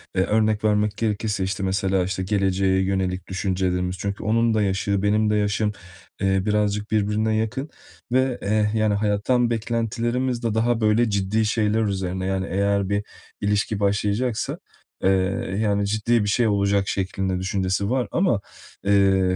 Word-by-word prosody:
eee, 95 - +3
örnek 110 0 +1
vermek 105 0 +1
gerekirse, 105 -2 -1
işte, 95 +1 -2
mesela, 95 -1 +1
işte, 95 0 -3
geleceğe 95 -1 +1
yönelik 95 -1 -1
düşüncelerimiz. 90 -1 -1
Çünkü 100 +2 -4
onun 115 +1 +2
da 110 - +2
yaşı, 100 0 0
benim 105 +1 +2
de 105 - +2
yaşım, 105 0 +1 0.5
eee, 95 -1 +2
birazcık 105 0 0
birbirine 110 +1 +1
yakın 120 +7 -2 0.4
ve, 130 0 +1
eee, 105 +1 +1
yani, 110 -1 +2
hayattan 105 +4 +1
beklentilerimiz 120 +2 -1
de 115 -2 0
daha, 115 +1 +1
böyle, 110 +2 +3
ciddi 100 +2 0
şeyler 110 0 +1
üzerine. 95 -2 -2
Yani, 95 0 -1
eğer 100 0 +1
bir 100 0 0 0.4
ilişki 100 +1 0
başlayacaksa, 105 +3 0 0.5
eee, 95 - +4 0.5
yani, 100 -1 +1
ciddi 110 +2 +1
bir 105 - -1
şey 115 +2 +2
olacak 100 -1 +1
şeklinde 95 -1 -2
düşüncesi 95 +1 -1
var. 130 -1 0
Ama, 170 - +1 0.4
eee, 95 -2 +3
105 Hz, 150 wpm, -23 LUFS, 95-110 Hz, 0.5 s, eee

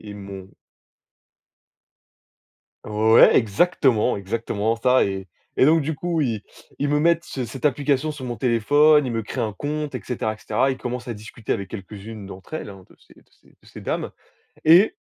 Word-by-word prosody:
ils 105 -1 -9
m'ont 95 -1 -10 2.3
Ouais, 110 +2 +5
exactement, 125 - +2
exactement 110 +2 -2
ça 125 +2 +3
et 95 -1 -4 0.3
et - - +6
donc 160 +1 +4
du 155 +3 -2
coup, 170 +2 -2
ils 115 -6 -2 0.4
ils 145 - 0
me 145 +1 +2
mettent 170 +2 +2
ce 130 - -4
cette 130 +5 -3
application 140 +1 +1
sur 145 -3 -8
mon 120 -1 -4
téléphone. 145 +6 +4
Ils 125 - -3
me 115 - -1
créent 105 - -5
un 110 - -2
compte 150 +6 -4
et 125 - -3
cetera 110 -1 -2
et 110 - -11
cetera. 115 +5 0
Ils 130 - -4
commencent 125 -1 -5
à - - -2
discuter 110 +1 -6
avec 100 -4 -3
quelques-unes 105 +1 -9
d'entre 95 +8 -10
elles, 155 - -5
hein, 95 -1 -13
de - - -21
ces - - -22
de - - -30
ces - - -28
de - - -26
ces - - -11
dames - - -3 0.6
et 180 - +7
120 Hz, 185 wpm, -23 LUFS, 105-145 Hz, 2.3 s, et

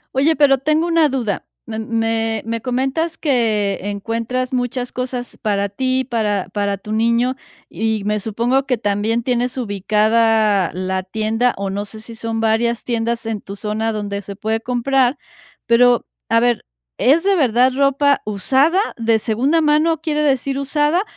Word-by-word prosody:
Oye, 305 +4 +3
pero 275 -2 +4
tengo 310 +5 +1
una 330 -2 +4
duda. 240 -7 -2 0.2
Me 220 -1 -5
me 225 -1 -1
me 230 0 -3
comentas 270 +7 -1
que 220 - +1
encuentras 230 +5 -3
muchas 245 0 -2
cosas 250 -1 -5
para 200 -2 0
ti, 260 +5 0
para 215 -6 -1
para 200 -1 -1
tu 210 +2 -9
niño, 235 +4 +1 0.3
y 220 +2 -1
me 210 0 0
supongo 235 +6 0
que 250 -3 0
también 215 +2 0
tienes 245 +1 -1
ubicada 215 -2 +2
la 185 +1 -2
tienda, 220 +5 0
o 195 0 -3
no 200 +2 -3
sé 215 +2 -10
si 230 +1 -10
son 225 0 -3
varias 225 +1 +1
tiendas 235 -1 -2
en 225 -2 -2
tu 200 - -8
zona 220 +2 -2
donde 200 -1 -4
se 200 0 -8
puede 220 +2 -1
comprar, 250 +2 +1 0.5
pero, 240 +1 +4 0.2
a 230 - +3
ver, 240 -1 +1 0.3
¿es 310 +7 +3
de 395 0 +3
verdad 255 -3 +3
ropa 280 +1 +2
usada? 265 - +2 0.2
¿De 230 -1 +2
segunda 265 +10 +1
mano, 310 +1 +2
quiere 300 -2 -1
decir 275 -1 0
usada? 295 +6 +1
230 Hz, 160 wpm, -19 LUFS, 215-265 Hz, 0.5 s, pero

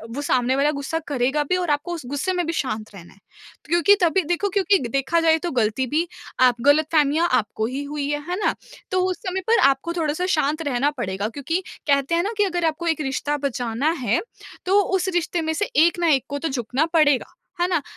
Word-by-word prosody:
वो 285 - -3
सामने 255 -2 +1
वाला 285 +2 +2
ग़ुस्सा 295 +3 -3
करेगा 280 +1 0
भी 365 - +3
और 355 -2 -2
आपको 295 +4 -1
उस 310 -6 -8
ग़ुस्से 285 +9 -2
में 355 -1 -1
भी 330 - -2
शांत 215 -5 -5
रहना 175 -3 -13
है - - -24 0.5
क्योंकि 345 +5 +4
तभी 355 +2 +3
देखो 350 +5 -1
क्योंकि 390 0 +2
देखा 275 +7 0
जाए 325 -1 +4
तो - - -3
ग़लती 240 +1 0
भी 320 +6 0 0.3
आप 250 -2 +4
ग़लतफ़हमियाँ 305 +2 +3
आपको 220 0 0
ही 260 +5 -3
हुई 285 0 -4
है, 295 0 -1
है 360 - 0
ना? - - +1 0.4
तो 370 0 +2
उस 365 - -3
समय 375 +1 -2
पर 460 0 +4
आपको 275 +5 -2
थोड़ा-सा 325 +1 -1
शांत 305 +2 0
रहना 275 +2 +1
पड़ेगा 205 -7 -3
क्योंकि 290 +9 -2 0.3
कहते 280 +3 +2
हैं 340 - +1
ना 425 - -2
कि 415 - +4
अगर 350 -3 -1
आपको 325 +2 -1
एक 320 -2 0
रिश्ता 290 +1 -2
बचाना 255 0 -1
है, 345 - +2 0.4
तो 390 +2 +4
उस 380 -1 -1
रिश्ते 350 0 0
में 320 0 -1
से 410 +6 -1
एक 340 +2 +4
ना 340 - +1
एक 270 -4 +2
को 285 0 -3
तो 325 - -2
झुकना 260 +3 -1
पड़ेगा। 295 -5 +3 0.3
है 355 - +3
ना? 350 -4 0
300 Hz, 220 wpm, -22 LUFS, 270-345 Hz, 0.5 s, क्योंकि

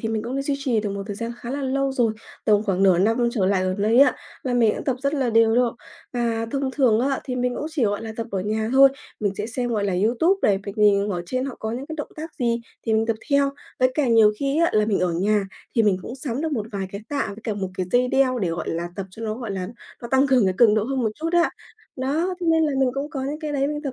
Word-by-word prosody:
thì 220 - -2
mình 220 -1 -1
cũng 245 +4 -4
đã 275 - -1
duy 280 0 -1
trì 250 -6 0
được 205 -1 -3
một 200 0 -4
thời 205 - -5
gian 230 +2 -4
khá 240 - -7
là 280 +1 -3
lâu 270 +1 0
rồi, 235 -4 +2 0.3
tầm 210 -1 +4
khoảng 195 -2 0
nửa 185 -3 +5
năm 225 +5 +2
trở 195 -6 +1
lại 190 -1 +2
gần 185 +2 -1
đây 225 +4 +3
á, 280 -2 +5 0.3
và 255 - -1
mình 230 -3 +4
cũng - - -6
tập 265 -3 0
rất 280 +2 0
là 260 -4 0
đều 225 0 +4
luôn. 245 -1 +2 0.4
Và 230 -2 -1
thông 270 0 -1
thường 250 -6 +3
á, 270 +1 0
thì 255 -3 -3
mình 250 0 0
cũng 300 - -3
chỉ, 290 -7 0
gọi 205 +1 -1
là, 220 -1 -5
tập 230 0 -3
ở 195 -1 -1
nhà 220 +2 -1
thôi, 275 +1 +8 0.3
mình 200 -2 0
sẽ 210 +2 -3
xem, 245 +1 -3
gọi 210 -3 0
là, 195 - 0
YouTube 320 - +3
này, 195 -2 +3
việc 200 +2 -7
nhìn 205 -1 +4
ở 175 -3 -2
trên 255 +4 -1
họ 270 -2 -5
có 220 - -3
những 260 +4 -5
cái 315 - -6
động 295 - -5
tác 315 +1 -6
gì 235 -1 +1 0.3
thì 220 - +1
mình 220 +1 +2
tập 230 - 0
theo. 280 0 +3 0.3
Với 255 0 +4
cả 295 -4 +1
nhiều 220 -2 +6
khi 280 +2 0
á 335 - +3
là 215 0 +3
mình 205 -3 +1
ở 180 -2 +1
nhà 200 +4 +1 0.3
thì 230 - +4
mình 200 -3 +3
cũng 240 - -7
sắm 265 -1 -4
được 320 -1 -2
một 215 -5 -2
vài 195 -2 -3
cái 200 - -5
tạ 285 -4 -1
với 205 +2 -8
cả 215 - -1
một 190 -2 -3
cái 185 -1 -2
dây 250 +1 +3
đeo 260 -2 +2
để, 185 -5 0
gọi 165 0 -4
là, 170 +1 -2
tập 195 -1 -4
cho 225 - -10
nó, 215 0 -2
gọi 235 -3 -6
là, 185 -1 -3 0.3
nó 235 - -5
tăng 265 +1 +4
cường 260 -5 +4
cái 185 -1 +1
cường 225 -3 +6
độ 215 -1 +1
hơn 265 0 -1
một 220 - +1
chút 325 +1 -3
á. 345 -1 +3 0.5
Đó, 315 +8 0
nên 325 -2 +3
là 300 - +1
mình 265 -2 +3
cũng 280 +2 -3
có 275 -4 -4
những 295 +3 -4
cái 300 -1 -3
đấy 275 -1 +1
mình 295 +1 -3
tập 275 -3 -3
235 Hz, 300 wpm, -23 LUFS, 210-275 Hz, 0.5 s, thôi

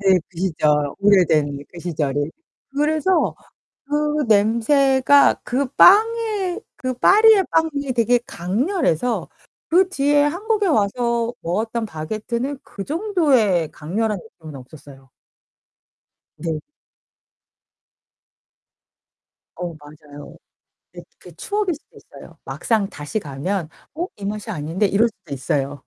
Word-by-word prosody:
네, 190 -2 +4
그 175 - -13
시절. 170 -4 0 0.3
오래된 160 -8 +3
그 175 - -10
시절이. 145 -3 -2 0.4
그래서 310 +5 +1 0.5
그 300 +1 0
냄새가 265 +6 +4
그 270 +3 -1
빵에 425 -2 +4 0.2
그 255 -3 -3
파리의 420 - +5
빵이 290 -4 0
되게 240 +1 +3
강렬해서 235 - -1 0.4
그 365 +3 +4
뒤에 290 -4 +2
한국에 410 +7 0
와서 235 - 0
먹었던 220 +6 -2
바게트는 220 - -4
그 195 - -8
정도의 280 - +1
강렬한 205 +6 -2 0.2
느낌은 155 -4 -10
없었어요. 135 0 -14 1.3
네. 165 -2 -3 3.0
어, 175 -1 -5
맞아요. 150 -1 -13 0.6
네 - - -9 0.2
그 - - -14
추억일 410 -3 -2
수도 295 - -20
있어요. - - -15
막상 215 -4 -1
다시 150 +5 -5
가면 165 +3 -4 0.3
'어 340 +3 -2
이 205 - -12
맛이 210 +2 -5
아닌데.' 170 +2 -1
이럴 210 +4 +2
수도 205 - -12
있어요. 135 +1 -2
220 Hz, 225 characters per minute, -21 LUFS, -, 3.0 s, 파리의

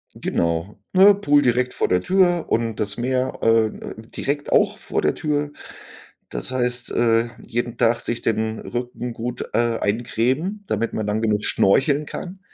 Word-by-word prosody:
Genau, 85 +4 -2
ne? 195 +2 +8
Pool 145 -7 +3
direkt 125 -1 +1
vor - - 0
der 90 0 +2
Tür 180 - +2
und 115 -1 0
das 105 -1 0
Meer, 130 +1 -1
äh, 115 0 +4
äh, - - -8
direkt 140 +5 -4
auch 210 0 +3
vor - - -2
der - - +1
Tür, 150 -2 -1 0.8
das - - -6
heißt, 125 -1 -1
äh, 115 0 +2 0.2
jeden 120 0 -3
Tag 115 0 +3
sich 120 - -3
den 110 0 -1
Rücken 120 0 -5
gut, 120 +2 -4
äh, 115 0 +1
eincremen, 125 - -1
damit 115 +2 -1
man 110 - -2
dann 105 +1 -1
genug 105 -2 +1
schnorcheln 140 +9 +3
kann. 185 +5 -7
120 Hz, 165 wpm, -22 LUFS, 115-145 Hz, 0.8 s, ne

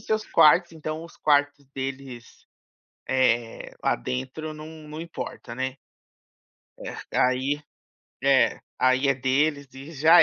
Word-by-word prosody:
seus 215 0 -1
quartos, 165 +3 +5
então 155 0 -5
os 170 - -14
quartos 145 -1 +2
deles, 135 - -7 0.6
eh, 120 -3 +1
lá - - +3
dentro 130 - -4
não 155 0 -9
não 155 -1 -9
importa, 130 -7 -7
né. 130 +1 -3 1.0
É, - - -6 0.2
aí 130 +3 +2 0.6
É, 135 -3 +4 0.2
aí 130 +2 +3
é 135 - +4
deles 140 +3 +1
e 140 +4 -10
já 160 +3 +7
140 Hz, 125 wpm, -25 LUFS, 130-155 Hz, 1.0 s, já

